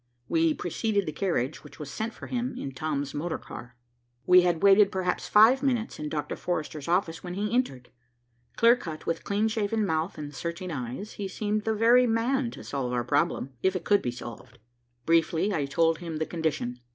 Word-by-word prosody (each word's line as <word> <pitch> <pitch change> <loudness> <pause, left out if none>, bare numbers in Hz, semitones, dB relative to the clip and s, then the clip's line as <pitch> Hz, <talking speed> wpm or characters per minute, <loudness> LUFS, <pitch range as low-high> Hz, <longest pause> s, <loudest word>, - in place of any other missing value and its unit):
We 165 -1 +2
preceded 200 +3 -1
the 155 - -3
carriage 155 -5 -2
which 150 - -14
was 145 -2 -7
sent 220 +8 -3
for - - -10
him, 250 +1 -3
in 135 - -5
Tom's 145 0 -3
motor 160 +3 -2
car. 125 +1 -10 0.5
We 180 0 +7
had 175 0 0
waited 200 0 +6
perhaps 185 -1 -1
five 225 +5 +6
minutes 245 -5 -1
in 150 0 -4
Dr. 150 -1 -3
Forrester's 155 -4 -4
office, 170 -2 0
when 180 -1 -5
he 210 +2 -2
entered. 135 - -1 0.6
Clear 230 +1 +6
cut, 160 -10 -7
with 165 0 -2
clean 205 +2 +1
shaven 220 0 0
mouth 160 0 -1
and 145 -1 -6
searching 170 +4 -5
eyes, 130 - -5
he 200 - -4
seemed 210 +2 -2
the 220 0 +1
very 240 +3 +5
man 240 +3 +1
to - - -10
solve 135 -3 -3
our 120 -1 0
problem, 145 +1 0
if 190 0 +1
it 175 -3 -4
could 205 +3 +4
be - - -2
solved. 120 0 -9 0.5
Briefly 165 +4 +2
I 145 -5 0
told 165 +3 +2
him 165 -3 -5
the 160 - -1
condition. 150 -8 -2
175 Hz, 195 wpm, -27 LUFS, 150-210 Hz, 0.6 s, We